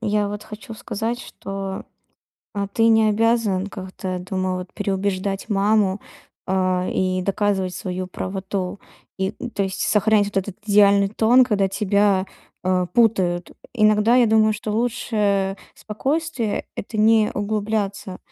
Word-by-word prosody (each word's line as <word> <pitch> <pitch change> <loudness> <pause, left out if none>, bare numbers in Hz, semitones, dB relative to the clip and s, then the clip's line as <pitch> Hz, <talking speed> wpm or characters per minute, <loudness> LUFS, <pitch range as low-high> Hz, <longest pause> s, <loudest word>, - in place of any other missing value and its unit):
я 210 -2 0
вот 205 0 -6
хочу 220 +2 -9
сказать, 225 +3 -4
что, 195 -1 -6 0.7
а, 200 -1 -1
ты 225 +2 +2
не 220 -1 +5
обязан 215 -3 +1
как-то, 190 -1 -7
я - - -3
думаю, 185 0 -2
вот 180 0 -8
переубеждать 195 0 -2
маму, 200 -1 +2 0.5
а, 185 -1 0
и 185 0 0
доказывать 195 -2 0
свою 185 0 -4
правоту. 190 +1 -4 0.4
И, 190 0 -1
м, 245 - -5
то 200 - -2
есть 190 -1 -3
сохранять 210 0 +3
вот 205 - -8
этот 195 0 -2
идеальный 200 -1 +5
тон, 235 +4 +4
когда 200 -5 +1
тебя, 200 -1 +2 0.4
э, 185 -1 +1
путают. 185 -7 +2 0.2
Иногда 215 +1 +4
я 245 -2 +5
думаю, 220 0 +4
что 210 0 -5
лучшее 210 -4 0 0.2
спокойствие- 265 +1 -2
это 215 - -6
не 215 0 +4
углубляться. 205 -2 -2
205 Hz, 140 wpm, -22 LUFS, 190-220 Hz, 0.7 s, не